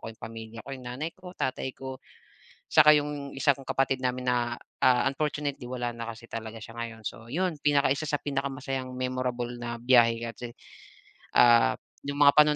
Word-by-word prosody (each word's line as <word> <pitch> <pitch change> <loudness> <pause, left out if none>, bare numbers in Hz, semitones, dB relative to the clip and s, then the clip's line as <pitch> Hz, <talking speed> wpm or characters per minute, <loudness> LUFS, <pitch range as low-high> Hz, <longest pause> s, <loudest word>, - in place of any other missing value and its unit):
ko - - -7
'yong 110 - -10
pamilya 115 0 -8
ko, 140 - -7
'yong 130 -2 -8
nanay 150 +7 -4
ko, 180 -1 -12
tatay 130 0 -2
ko 130 0 -7 0.7
tsaka 150 +1 +8
yung 145 -1 -2
isa 140 +1 +3
kong 135 -1 -2
kapatid 135 -1 +1
namin 125 0 -1
na, 120 -1 0 0.2
ah, 125 -1 +4
unfortunately 145 -2 -2
wala 120 -1 -3
na 115 -1 -6
kasi 115 +1 -15
talaga 110 0 -6
siya 115 +1 -10
ngayon. 115 -1 -6
So 110 +2 -6
'yon 165 +4 -1
pinakaisa 145 0 +2
sa 145 0 -1
pinakamasayang 135 -2 -3
memorable 125 -1 -2
na 120 0 -4
biyahe 120 -2 +5
kasi, 120 0 -8 0.8
ah, 120 - +6 0.3
yung 140 - -3
mga 140 - +9
panahon 150 0 +6
130 Hz, 175 wpm, -28 LUFS, 120-140 Hz, 0.8 s, mga